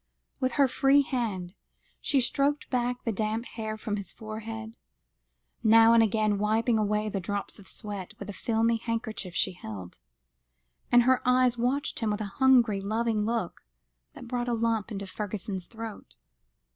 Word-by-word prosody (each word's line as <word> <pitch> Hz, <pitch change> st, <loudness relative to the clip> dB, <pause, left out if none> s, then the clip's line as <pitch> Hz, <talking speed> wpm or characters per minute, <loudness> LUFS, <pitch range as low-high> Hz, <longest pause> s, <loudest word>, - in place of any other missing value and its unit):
With 255 Hz, -2 st, 0 dB
her 280 Hz, +1 st, +4 dB
free 275 Hz, +3 st, +4 dB
hand 205 Hz, -10 st, -3 dB, 0.5 s
she 275 Hz, -, +2 dB
stroked 285 Hz, +4 st, +1 dB
back 245 Hz, -1 st, -1 dB
the 230 Hz, -, 0 dB
damp 220 Hz, +2 st, -2 dB
hair 220 Hz, -2 st, -5 dB
from 215 Hz, -1 st, -3 dB
his 200 Hz, -3 st, -5 dB
forehead, 220 Hz, +1 st, -7 dB, 0.9 s
now 225 Hz, 0 st, +7 dB
and 230 Hz, -, +6 dB
again 215 Hz, -1 st, +2 dB
wiping 220 Hz, +2 st, +2 dB
away 210 Hz, 0 st, 0 dB
the 200 Hz, -2 st, -2 dB
drops 200 Hz, +3 st, -4 dB
of 195 Hz, -, -11 dB
sweat 205 Hz, -4 st, -6 dB
with 200 Hz, -, -8 dB
a 205 Hz, -, -5 dB
filmy 230 Hz, +2 st, +1 dB
handkerchief 220 Hz, -5 st, -4 dB
she 190 Hz, -, +2 dB
held, 100 Hz, -, -9 dB, 0.9 s
and 245 Hz, 0 st, +7 dB
her 260 Hz, +1 st, +3 dB
eyes 250 Hz, -1 st, +3 dB
watched 250 Hz, +4 st, -1 dB
him 225 Hz, -, 0 dB
with 210 Hz, +1 st, -1 dB
a -, -, -2 dB, 0.2 s
hungry, 240 Hz, -6 st, +5 dB
loving 220 Hz, +1 st, 0 dB
look, 230 Hz, +1 st, -2 dB, 0.5 s
that 245 Hz, -, -10 dB
brought 245 Hz, 0 st, -2 dB
a -, -, +1 dB
lump 230 Hz, -1 st, 0 dB
into 200 Hz, -1 st, -4 dB
Fergusson's 195 Hz, -1 st, -5 dB
throat. 225 Hz, -2 st, -9 dB
225 Hz, 160 wpm, -28 LUFS, 210-240 Hz, 0.9 s, now